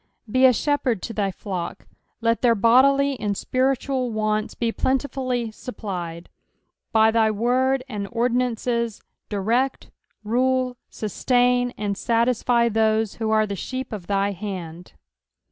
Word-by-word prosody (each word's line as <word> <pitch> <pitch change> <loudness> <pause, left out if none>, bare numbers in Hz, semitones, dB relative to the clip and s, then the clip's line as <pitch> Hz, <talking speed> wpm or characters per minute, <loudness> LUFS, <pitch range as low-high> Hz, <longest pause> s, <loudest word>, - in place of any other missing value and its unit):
Be 255 +4 +3
a - - +6
shepherd 250 -4 0
to 230 - -4
thy 205 -2 0
flock, 185 -1 -5 0.4
let 230 0 +1
their 235 -2 +4
bodily 270 +5 +4
and 205 -2 -2
spiritual 260 0 0
wants 215 -1 -1
be 230 -1 -1
plentifully 255 -3 -1
supplied. 180 -8 -6 0.6
By 220 0 +5
thy 220 -1 +3
word, 255 +5 +1
and 205 -5 -4
ordinances, 235 -1 -1 0.3
direct, 230 +6 -1 0.3
rule, 255 +3 +1
sustain, 245 +3 +1
and 205 -1 -2
satisfy 235 +1 +2
those 220 -1 +1
who 220 - 0
are 215 0 +3
the 200 -1 -4
sheep 255 +6 -5
of 195 -5 -7
thy 200 0 +1
hand. 180 -4 -7
230 Hz, 130 wpm, -23 LUFS, 210-255 Hz, 0.6 s, a